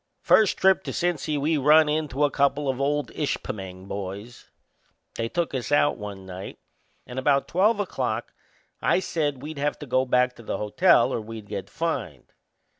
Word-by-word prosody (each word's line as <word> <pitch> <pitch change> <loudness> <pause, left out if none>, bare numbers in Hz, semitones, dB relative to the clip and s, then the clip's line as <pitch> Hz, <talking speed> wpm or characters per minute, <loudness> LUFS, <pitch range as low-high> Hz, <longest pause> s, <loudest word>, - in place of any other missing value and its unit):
First 215 -3 +4
trip 190 0 +4
to - - -3
Cincy 160 -4 -1
we 155 +3 +1
run 150 +3 +6
into 150 -2 -1
a 145 - +3
couple 140 +1 +1
of 135 0 -1
old 145 -2 0
Ishpeming 95 -2 -4
boys. 100 +4 -7 0.6
They 115 0 -3
took 170 +1 -2
us 130 +1 -3
out 145 0 +4
one 100 -3 -8
night, 95 +1 -8 0.5
and 125 +1 -5
about 140 +1 +2
twelve 205 +5 +2
o'clock 205 - -2 0.5
I - - +3
said 145 -7 -2
we'd 150 -1 -6
have 145 +1 -1
to 150 - -8
go 130 0 +1
back 125 0 +2
to - - -11
the 115 - -3
hotel 105 -1 +3
or - - -1
we'd 110 -1 -9
get 100 -2 -5
fined. 125 - -4
140 Hz, 175 wpm, -25 LUFS, 110-150 Hz, 0.6 s, run